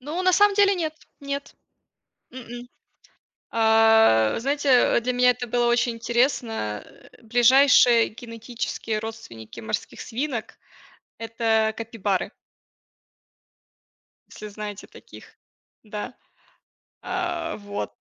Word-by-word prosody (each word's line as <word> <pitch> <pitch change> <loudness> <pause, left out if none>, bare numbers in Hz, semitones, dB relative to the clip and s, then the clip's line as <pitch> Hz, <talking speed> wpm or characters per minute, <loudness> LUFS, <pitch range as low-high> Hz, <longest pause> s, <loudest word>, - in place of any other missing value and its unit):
Ну, 310 +8 -4
на 370 0 +3
самом 410 +1 +4
деле 400 -1 +4
нет, 315 -3 -3 0.3
нет. 280 0 -6 0.8
М-м. 245 -1 -10 0.8
А 220 - +4
знаете, 275 -2 +2
для 250 +2 -2
меня 250 0 +4
это 245 0 -6
было 240 +1 +1
очень 240 0 +1
интересно. 230 - -1 0.4
Ближайшие 245 0 +5
генетические 230 -1 -5
родственники 165 - -9
морских 110 0 -5
свинок- 250 -1 -5 0.6
это 225 -1 0
капибары. 215 -4 -3 2.0
Если 210 - -10
знаете 210 -1 -8
таких, - - -16 0.5
да. 215 +3 -7 0.9
А, 350 -4 -3
вот. 205 -1 -6
235 Hz, 95 wpm, -24 LUFS, 220-265 Hz, 2.0 s, Ближайшие